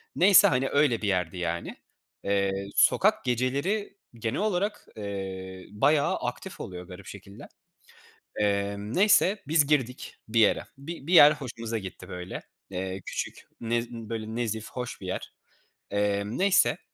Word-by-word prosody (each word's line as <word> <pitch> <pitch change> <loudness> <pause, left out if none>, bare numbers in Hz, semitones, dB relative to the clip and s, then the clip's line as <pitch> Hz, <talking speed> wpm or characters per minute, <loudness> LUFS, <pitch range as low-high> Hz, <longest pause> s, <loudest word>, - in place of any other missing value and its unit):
Neyse, 190 +1 +7
hani, 135 +1 +1
öyle 140 -6 +2
bir 105 - -1
yerdi, 90 -2 0
yani. 85 -1 -3 0.5
Eee, 100 -1 +1 0.2
sokak - - +4
geceleri 140 - -1 0.2
genel 115 +4 -3
olarak, 205 0 -1
eee, 95 -2 -6
bayağı 145 +8 +2
aktif 125 +10 -5
oluyor 90 -1 -7
garip 90 +1 -11
şekilde. 100 0 -11 0.9
Emm, 100 +1 -1
neyse 200 +1 +4
biz 150 -2 +3
girdik 130 -4 -1
bir 115 +1 +1
yere. 105 - +4
Bi 150 +1 -8
bir 180 - 0
yer 150 -3 +10
hoşumuza 115 -5 -5
gitti, 95 -1 -8
böyle, 90 0 -6 0.3
eee, 95 +1 -4
küçük, - - -5 0.2
nez 115 +1 -1
böyle, 110 -1 -6
nezih 110 -2 -2
hoş 125 -3 -6
bir 95 - -7
yer. - - -5 0.6
Emm, 100 +1 -1
neyse 195 0 +3
115 Hz, 140 wpm, -27 LUFS, 100-145 Hz, 0.9 s, yer